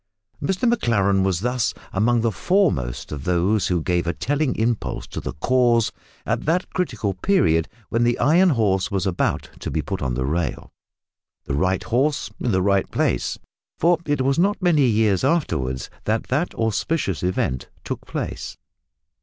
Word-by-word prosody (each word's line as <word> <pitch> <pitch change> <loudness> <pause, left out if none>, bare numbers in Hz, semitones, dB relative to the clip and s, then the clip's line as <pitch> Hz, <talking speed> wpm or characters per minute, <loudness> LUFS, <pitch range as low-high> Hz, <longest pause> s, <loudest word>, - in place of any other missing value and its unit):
Mr 190 +6 0
Maclaren 100 - +2
was 95 -2 +1
thus 125 +1 0 0.2
among 115 +4 +2
the 115 0 +1
foremost 145 - 0
of 70 -3 -5
those 90 +5 +1
who 90 -3 0
gave 85 -1 0
a 85 - +1
telling 145 -1 0
impulse 110 - -1
to - - -6
the - - -5
cause 120 - +2 0.3
at - - -1
that 170 +4 0
critical 115 - -1
period 85 - +2 0.2
when 115 +1 +1
the 120 0 +2
Iron 175 +6 +4
horse 105 - +1
was 95 -1 -1
about 95 -3 -1
to - - -4
be - - -1
put - - -4
on 65 -2 -1
the 65 +1 -1
rail 75 0 -2 0.7
the 70 - -4
right 90 +6 +1
horse 135 +6 0
in 120 - 0
the 95 -2 +2
right 100 -1 +2
place - - 0 0.4
for 170 0 +3
it 145 -3 +1
was 135 +3 +1
not 200 +4 +2
many 165 -8 +3
years 105 -4 +2
afterwards 70 - 0 0.2
that 110 +1 0
that 150 +8 0
auspicious 110 - -1
event 90 -8 -1
took - - -6
place. - - -5
110 Hz, 165 wpm, -22 LUFS, 90-145 Hz, 0.7 s, Iron